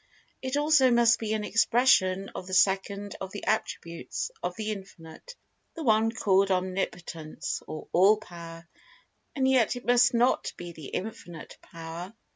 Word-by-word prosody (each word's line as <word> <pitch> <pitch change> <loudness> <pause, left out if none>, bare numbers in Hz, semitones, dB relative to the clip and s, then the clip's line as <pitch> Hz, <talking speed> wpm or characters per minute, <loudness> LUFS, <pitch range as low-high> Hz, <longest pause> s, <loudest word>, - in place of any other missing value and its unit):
It 260 +2 -2
also 295 -3 +4
must 235 -1 +4
be 220 -1 -2
an 215 - -3
expression 210 -4 +3
of 185 - -7
the 185 - -2
second 200 +1 +1
of 190 0 -5
the 205 - -7
attributes 215 - -3
of 180 0 -3
the 215 +1 -3
Infinite—the 195 - -11
one 225 -2 +3
called 195 -3 +2
Omnipotence, 180 -4 -3
or 155 - -7
All 195 +5 +5
Power—and 170 - -8
yet 255 -3 +3
it 245 - -8
must 245 0 +4
not 240 +2 +2
be 175 0 -7
The 160 -4 -10
Infinite 180 -5 -7
Power. 170 +3 -8
200 Hz, 140 wpm, -27 LUFS, 175-235 Hz, -, All